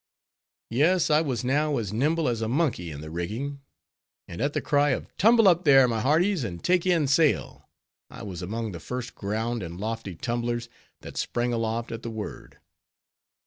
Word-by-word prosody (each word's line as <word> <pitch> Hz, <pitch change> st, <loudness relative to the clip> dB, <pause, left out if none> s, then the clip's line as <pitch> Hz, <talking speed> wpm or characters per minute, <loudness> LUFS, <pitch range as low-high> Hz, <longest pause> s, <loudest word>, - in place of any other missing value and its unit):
Yes, 160 Hz, +7 st, +3 dB
I 150 Hz, +1 st, +5 dB
was 130 Hz, -7 st, -2 dB
now 145 Hz, +3 st, +1 dB
as 105 Hz, -4 st, -3 dB
nimble 155 Hz, +7 st, +1 dB
as 115 Hz, -2 st, -1 dB
a 110 Hz, -, -1 dB
monkey 125 Hz, -, 0 dB
in 75 Hz, -2 st, -7 dB
the 80 Hz, 0 st, -8 dB
rigging, 115 Hz, -, -4 dB, 0.7 s
and 85 Hz, -, -7 dB
at 145 Hz, +2 st, 0 dB
the -, -, 0 dB
cry 145 Hz, 0 st, +2 dB
of -, -, -13 dB
"tumble 225 Hz, +1 st, +5 dB
up 175 Hz, -1 st, +4 dB
there, 135 Hz, -4 st, +7 dB
my 115 Hz, -2 st, -1 dB
hearties, 160 Hz, -, +2 dB
and 85 Hz, -6 st, -6 dB
take 180 Hz, 0 st, +2 dB
in 170 Hz, -4 st, +3 dB
sail," 145 Hz, +2 st, +1 dB, 0.4 s
I -, -, -10 dB
was 95 Hz, -4 st, -6 dB
among 110 Hz, +4 st, -3 dB
the 85 Hz, -, -7 dB
first 125 Hz, +8 st, -5 dB
ground 110 Hz, +3 st, -2 dB
and 85 Hz, 0 st, -7 dB
lofty 110 Hz, -3 st, -4 dB
tumblers, 120 Hz, +3 st, -2 dB, 0.3 s
that -, -, -10 dB
sprang 120 Hz, 0 st, -1 dB
aloft 115 Hz, 0 st, -2 dB
at 115 Hz, -1 st, -5 dB
the 115 Hz, -, -5 dB
word. 110 Hz, -2 st, -7 dB
120 Hz, 185 wpm, -26 LUFS, 110-150 Hz, 0.7 s, there